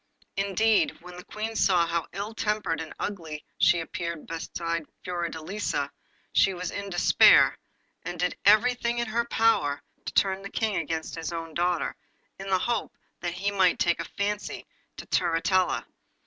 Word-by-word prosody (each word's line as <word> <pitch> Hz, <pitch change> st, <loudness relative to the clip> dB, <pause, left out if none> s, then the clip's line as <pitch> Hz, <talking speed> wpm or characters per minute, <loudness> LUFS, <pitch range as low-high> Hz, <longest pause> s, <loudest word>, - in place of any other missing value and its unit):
Indeed, 200 Hz, +3 st, +2 dB
when 180 Hz, +1 st, -11 dB
the 180 Hz, -, -9 dB
Queen 220 Hz, +1 st, -5 dB
saw 180 Hz, -5 st, +4 dB
how 170 Hz, 0 st, -1 dB
ill 200 Hz, +4 st, -5 dB
tempered 210 Hz, -7 st, -1 dB
and 160 Hz, -, -7 dB
ugly 160 Hz, -7 st, -5 dB
she 175 Hz, -, +5 dB
appeared 170 Hz, -1 st, -5 dB
beside 165 Hz, 0 st, -4 dB, 0.2 s
Fiordelisa 170 Hz, -3 st, -2 dB, 0.4 s
she 195 Hz, -, +4 dB
was 180 Hz, 0 st, -4 dB
in 200 Hz, 0 st, -5 dB
despair, 175 Hz, -2 st, +6 dB, 0.5 s
and 175 Hz, -, -6 dB
did 180 Hz, +1 st, 0 dB
everything 235 Hz, +3 st, +4 dB
in 235 Hz, -, 0 dB
her 235 Hz, +1 st, 0 dB
power 225 Hz, -12 st, +2 dB, 0.2 s
to -, -, -4 dB
turn 190 Hz, -1 st, +2 dB
the 200 Hz, -, -7 dB
King 220 Hz, -2 st, -1 dB
against 160 Hz, 0 st, -3 dB
his 165 Hz, 0 st, -4 dB
own 165 Hz, -1 st, -5 dB
daughter, 175 Hz, 0 st, 0 dB, 0.4 s
in 195 Hz, 0 st, -6 dB
the 190 Hz, -, +4 dB
hope 230 Hz, +4 st, -2 dB, 0.2 s
that 175 Hz, -1 st, -3 dB
he 200 Hz, +3 st, -1 dB
might 190 Hz, -3 st, +3 dB
take 175 Hz, 0 st, +2 dB
a -, -, -3 dB
fancy 205 Hz, +1 st, -2 dB, 0.3 s
to -, -, -7 dB
Turritella. 180 Hz, +2 st, +1 dB
180 Hz, 160 wpm, -27 LUFS, 170-210 Hz, 0.5 s, despair